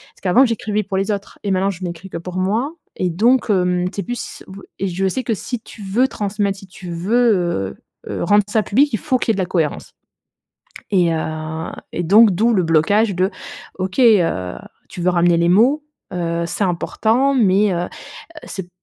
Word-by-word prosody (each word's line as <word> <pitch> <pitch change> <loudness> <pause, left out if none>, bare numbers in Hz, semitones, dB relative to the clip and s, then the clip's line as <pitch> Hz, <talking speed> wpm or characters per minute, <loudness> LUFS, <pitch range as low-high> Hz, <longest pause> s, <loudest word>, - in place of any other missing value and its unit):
Parce - - -24
qu'avant 195 +8 +5
j'écrivais 220 -3 0
pour 195 -1 -3
les 195 +2 0
autres 200 -1 -5
et 200 - -1
maintenant, 190 +1 +1
je 190 -1 -6
n'écris 175 +2 -6
que 170 - -5
pour 180 +2 -7
moi 220 - 0 0.2
et 180 - -1
donc, 235 +7 +2
hem, 180 -2 +1
c'est 200 - -2
plus 245 +5 -6
b 195 +1 -10 0.2
et 195 - -1
je 190 +2 -1
sais 255 +7 -2
que 230 - 0
si 245 +4 -5
tu 220 - -13
veux 220 +7 +2
transmettre, 200 -3 -2
si 195 - -12
tu 180 -1 -9
veux, 175 - +1 0.3
heu - - -5
heu, - - -3
rendre 205 +3 +4
ça 215 0 +2
public, 275 +9 +2
il - - +2
faut 255 - +1
qu'il 230 - +1
y - - +1
ait - - -3
de - - -4
la - - 0
cohérence 165 -4 -2 1.0
et 175 -4 +3
heu 160 0 -4 0.2
et 175 - -2
donc, 210 +5 +6
d'où 225 +6 +2
le 190 -4 +2
blocage 185 +6 +2
de: 185 +3 +1 0.5
«OK, 185 +6 -3
heu, 175 - +3 0.3
tu - - -9
veux 180 - +2
ramener 175 -1 +3
les 170 - +2
mots, 255 +11 +4 0.3
heu, 170 -1 -1
c'est 200 - -2
important, 225 +9 +1
mais», 205 -4 +3
heu 175 0 -1
heu, - - -4 0.6
c'est 190 -2 -7
195 Hz, 205 wpm, -19 LUFS, 175-220 Hz, 1.0 s, donc